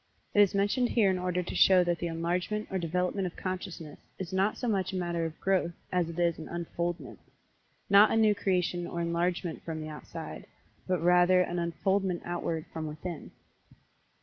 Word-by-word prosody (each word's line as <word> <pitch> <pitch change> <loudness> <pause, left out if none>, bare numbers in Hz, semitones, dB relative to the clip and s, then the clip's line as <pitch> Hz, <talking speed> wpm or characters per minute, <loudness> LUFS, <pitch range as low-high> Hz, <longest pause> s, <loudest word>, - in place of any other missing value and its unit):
It 205 - +6
is 200 -1 +4
mentioned 205 +5 +2
here 210 -5 +3
in 185 - -1
order 180 0 -1
to - - -6
show 185 -1 +6
that 175 -1 0
the 175 - -2
enlargement 175 +6 -2
or 190 - 0
development 180 +3 -1
of 175 - -8
consciousness 180 -5 -5 0.2
is 190 -1 -6
not 195 +3 +1
so 250 - -3
much 195 -4 0
a - - -5
matter 170 -2 -1
of 160 - -11
"growth" 190 -3 +1 0.2
as 180 -2 +1
it 170 - -8
is 170 -2 +1
an 160 - -8
"unfoldment" 170 -2 -4 0.7
not 205 +2 +7
a - - +1
new 215 -1 +5
creation 180 -3 0
or 170 - -4
enlargement 170 0 -1
from 155 -2 -5
outside, 150 -1 -8 0.4
but 185 -3 0
rather 180 +1 +5
an 175 -1 -1
unfoldment 185 +2 0
outward 170 -2 -2
from 160 -1 -4
within. 155 +2 -6
180 Hz, 180 wpm, -29 LUFS, 170-190 Hz, 0.7 s, not